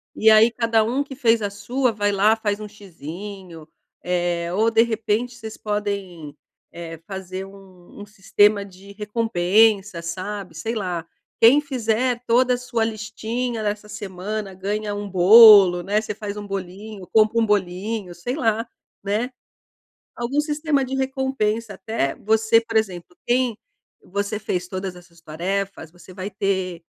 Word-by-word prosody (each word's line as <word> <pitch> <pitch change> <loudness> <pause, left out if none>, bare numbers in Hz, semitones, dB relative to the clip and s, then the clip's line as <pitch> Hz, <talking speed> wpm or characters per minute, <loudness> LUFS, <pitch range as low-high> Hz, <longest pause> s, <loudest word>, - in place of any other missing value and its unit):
E 220 - +4
aí, 220 +2 +6
cada 230 -1 +2
um 250 +6 0
que 275 -1 -10
fez 230 -4 +2
a 205 - -1
sua, 235 +6 -1
vai 205 -1 0
lá, 205 +2 +4
faz 210 -2 -2
um 215 - -6
xizinho, 185 -3 -10 0.4
eh, 175 -1 -1
ou 220 +4 +3
de 225 0 +4
repente 230 +1 -1
vocês 220 -2 -8
podem, 200 -7 -4 0.4
eh, 165 -1 -8
fazer 190 -1 -6
um 195 -1 -15
um - - -8
sistema 205 0 +2
de 195 +1 -14
recompensa, 210 -2 +2
sabe, 185 +1 -6
sei 220 +9 -4
lá. 180 -6 -3 0.3
Quem 255 +6 +7
fizer 250 -3 -1
toda 250 +2 +4
a - - -4
sua 240 -2 -2
listinha 225 +2 -4
dessa 210 0 -3
semana, 200 +1 -5
ganha 205 +3 -3
um 205 0 -5
bolo, 195 -1 +8
né, 200 +4 0
você 215 - -5
faz 205 0 -6
um 205 - -6
bolinho, 195 +1 -7
compra 220 +1 +4
um - - +3
bolinho, 200 0 -1
sei 245 +9 -4
lá, 225 -5 0 0.4
né. 215 +6 -1 0.8
Algum 240 +4 -1
sistema 300 -1 0
de 265 +1 -4
recompensa, 265 -5 -1
até 190 -8 -2
você 220 +1 +3
por 225 - -8
exemplo, 180 -5 -3
quem 245 -2 +1 0.5
você 200 +2 -3
fez 180 -4 -3
todas 185 0 -5
as 175 0 -14
suas 170 -1 -22
tarefas, 180 +2 -4
você 180 +1 -15
vai 190 +2 -5
ter, 190 -4 -2
210 Hz, 155 wpm, -22 LUFS, 185-225 Hz, 0.8 s, bolo